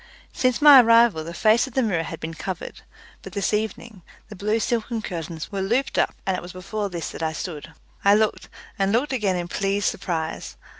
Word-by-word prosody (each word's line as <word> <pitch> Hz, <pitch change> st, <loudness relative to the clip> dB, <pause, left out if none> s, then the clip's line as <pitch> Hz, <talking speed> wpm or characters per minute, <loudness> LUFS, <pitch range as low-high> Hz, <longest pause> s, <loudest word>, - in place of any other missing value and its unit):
Since 255 Hz, +2 st, 0 dB
my 285 Hz, -3 st, +10 dB
arrival 230 Hz, -7 st, +4 dB
the 165 Hz, -, -7 dB
face 215 Hz, +8 st, +3 dB
of 265 Hz, -, -13 dB
the 265 Hz, -, +2 dB
mirror 190 Hz, -7 st, 0 dB
had 165 Hz, 0 st, -6 dB
been 160 Hz, +1 st, -5 dB
covered, 180 Hz, +2 st, -6 dB, 0.4 s
but -, -, -11 dB
this 200 Hz, 0 st, -1 dB
evening 220 Hz, -1 st, -3 dB, 0.3 s
the 210 Hz, -, -9 dB
blue 210 Hz, +3 st, 0 dB
silken 225 Hz, 0 st, -2 dB
curtains 165 Hz, -3 st, -6 dB
were 195 Hz, -1 st, -3 dB
looped 240 Hz, +8 st, 0 dB
up, -, -, +1 dB
and 190 Hz, -, 0 dB
it -, -, -4 dB
was 175 Hz, 0 st, -10 dB
before 200 Hz, +3 st, -4 dB
this 170 Hz, -3 st, -5 dB
that -, -, -8 dB
I 160 Hz, -1 st, -1 dB
stood. 155 Hz, -2 st, -7 dB, 0.3 s
I 200 Hz, +1 st, +6 dB
looked, 215 Hz, 0 st, 0 dB, 0.3 s
and 195 Hz, 0 st, +2 dB
looked 260 Hz, +5 st, +1 dB
again 205 Hz, -7 st, 0 dB
in 175 Hz, -1 st, -3 dB
pleased 195 Hz, +2 st, -1 dB
surprise. 160 Hz, -3 st, -3 dB
200 Hz, 205 wpm, -23 LUFS, 175-225 Hz, 0.4 s, my